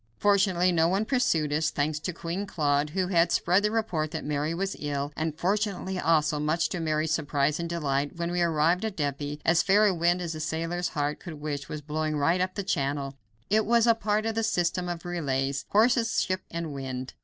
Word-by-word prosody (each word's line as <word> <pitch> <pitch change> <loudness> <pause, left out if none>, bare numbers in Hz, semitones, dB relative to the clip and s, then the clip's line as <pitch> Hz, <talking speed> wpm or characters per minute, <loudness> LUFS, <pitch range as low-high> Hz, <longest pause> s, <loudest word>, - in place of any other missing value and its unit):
Fortunately 190 -3 +3
no 165 -1 +3
one 195 +5 +1
pursued 170 - +1
us, 155 +1 +1
thanks 150 +1 -1
to 180 - -3
Queen 175 +4 -4
Claude, 145 -3 +1
who 185 +3 -1
had 170 -2 +3
spread 180 +3 +3
the 210 - +1
report 210 -9 -1
that 160 0 -5
Mary 150 +1 -1
was 195 +3 -2
ill, 145 0 -3
and 155 -1 -3
fortunately, 190 0 -1
also, 155 -3 +2
much 155 +3 0
to 180 - -3
Mary's 155 -1 0
surprise 145 -1 0
and 170 0 -3
delight, 145 -4 -1
when 170 0 -3
we 175 0 0
arrived 170 +2 +2
at 220 -3 -3
Dieppe, 145 0 -3
as 165 +1 +4
fair 205 +2 +4
a 200 - +3
wind 175 +1 +2
as 170 -2 -3
a 155 - -6
sailor's 165 +2 -2
heart 145 0 -1
could 170 -4 -8
wish 145 -2 -5
was 150 - -5
blowing 155 +1 -2
right 165 +5 +2
up 185 0 -1
the 200 - -2
channel. 140 -5 -2 0.4
It 215 +1 +4
was 235 +1 +3
a 230 - +6
part 215 -1 -1
of 225 - 0
the 225 - 0
system 180 -4 0
of 175 0 -5
relays 140 -5 -1
horses, 230 +2 +3
ship, 185 -1 -2
and 165 -3 -4
wind. 130 -2 -5
165 Hz, 210 wpm, -27 LUFS, 150-185 Hz, 0.4 s, a